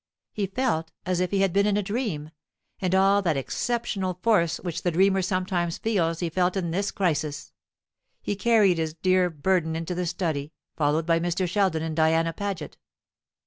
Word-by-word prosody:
He 205 -2 -1
felt 190 -7 -1
as 180 -1 0
if 180 0 0
he 195 +1 +1
had 195 -3 +2
been 200 +1 +3
in 205 -1 +2
a 210 - 0
dream; 195 - -3 0.5
and 185 -1 +1
all 195 +1 +4
that 165 -7 0
exceptional 195 - -2
force 170 -8 +3
which 170 -2 -5
the 180 - +1
dreamer 190 +3 +3
sometimes 185 -2 -1
feels 170 -7 0
he 170 - 0
felt 180 +2 +1
in 170 -3 -2
this 195 +4 0
crisis. 155 -6 -2 0.7
He 205 - -3
carried 205 -5 +3
his 160 -1 -2
dear 185 +1 +2
burden 160 +1 0
into 165 +2 -3
the 180 0 -2
study, 160 -4 -2 0.2
followed 155 +1 +1
by 165 0 +3
Mr. 175 +2 -1
Sheldon 185 -4 +1
and 160 -1 -3
Diana 165 +1 +2
Paget. 200 +1 -5
180 Hz, 180 wpm, -26 LUFS, 165-195 Hz, 0.7 s, all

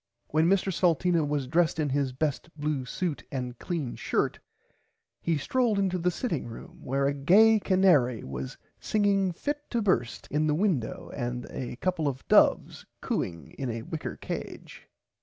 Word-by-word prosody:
When 155 +3 +3
Mr 195 0 +2
Salteena 170 -1 +2
was 145 -2 -1
dressed 165 +4 +1
in 150 -2 +1
his 135 -1 0
best 145 +5 -2
blue 145 -3 -1
suit 165 +3 -3
and 125 -3 -4
clean 160 -9 -3
shirt - - -1 0.8
he 165 -2 +1
stroled 230 - +1
into 190 -2 +1
the 175 +1 +2
sitting 175 - -2
room 115 - -11
where 135 +2 0
a 140 - +2
gay 205 +11 +5
canary 175 - +3
was 65 0 -6 0.2
singing 200 -3 +2
fit 290 - -4
to 235 - 0
burst 185 - 0
in 150 +1 +1
the 150 - +2
window 165 - -1
and 125 -1 -3
a 125 -1 -5
copple 165 +2 -1
of 130 -2 -4
doves - - +4 0.2
cooing 85 -4 -3
in 135 -2 -2
a 115 -1 -4
whicker 155 +5 -5
cage. - - -7
155 Hz, 160 wpm, -28 LUFS, 130-185 Hz, 0.8 s, gay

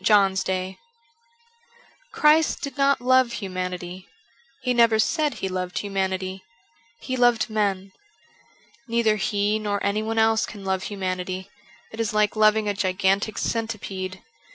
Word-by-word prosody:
JOHN'S 195 -2 +4
DAY 185 0 -3 1.3
CHRIST 315 -7 +3
did 280 -2 -5
not 275 -2 +2
love 255 -1 +3
humanity, 185 -2 -5 0.6
He 250 -1 +1
never 230 -2 +4
said 300 +6 +1
He 190 - -3
loved 185 -1 -4
humanity; 190 -1 -2 0.6
He 260 - -3
loved 240 -3 +3
men. 200 -3 -1 1.0
Neither 230 -2 +2
He 205 +1 0
nor 205 -1 -1
anyone 215 +2 -1
else 220 0 +3
can 200 -2 -10
love 190 -1 0
humanity; 185 -1 -4 0.4
it 220 - -10
is 225 -1 -1
like 210 0 +2
loving 215 0 +4
a 205 - +1
gigantic 195 +2 0
centipede. 195 -5 -3
205 Hz, 130 wpm, -24 LUFS, 190-225 Hz, 1.3 s, JOHN'S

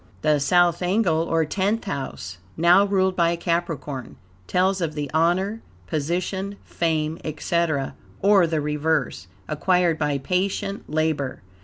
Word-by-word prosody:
The 150 -1 +3
South 175 +4 +3
angle, 180 -3 +2
or 165 -1 +1
Tenth 200 +7 0
House, 135 - -5 0.2
now 175 +4 +6
ruled 190 -2 +1
by 170 -1 +2
Capricorn, 165 -6 -3 0.3
tells 190 +1 +1
of 155 -3 -2
the 145 -3 -4
honor, 185 +7 +1 0.2
position, 180 +6 -2
fame, 160 -1 -1
etc. 155 -2 -1 0.3
(or 195 -3 +5
the 160 -2 -1
reverse) 150 - -1 0.2
acquired 175 +1 +1
by 150 -2 0
patient 190 +6 -2
labor. 155 - -1
170 Hz, 125 wpm, -23 LUFS, 150-185 Hz, 0.3 s, now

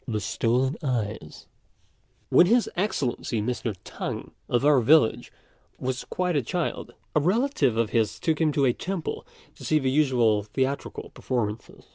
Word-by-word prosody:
THE 110 -3 -1
STOLEN 120 +6 0
EYES. 110 - -3 0.8
When 175 - +6
His 235 +3 +3
Excellency 140 - -1
Mr. 115 -1 -2
T'ang, - - -5 0.2
of 120 +3 +1
our 145 -2 +6
village, 140 -1 +3 0.5
was 130 0 -3
quite 180 -2 -1
a 145 - +3
child, 175 +8 -3 0.2
a - - +5
relative 180 - +1
of 115 -2 +1
his 110 -3 0
took 160 -1 0
him 155 -2 +3
to 140 -1 +2
a 125 - +3
temple 185 +2 -4 0.3
to - - -14
see 155 - +2
the 135 -3 0
usual 125 -7 +3
theatrical 130 +7 -3
performances. 110 -4 -4
130 Hz, 150 wpm, -26 LUFS, 115-155 Hz, 0.8 s, When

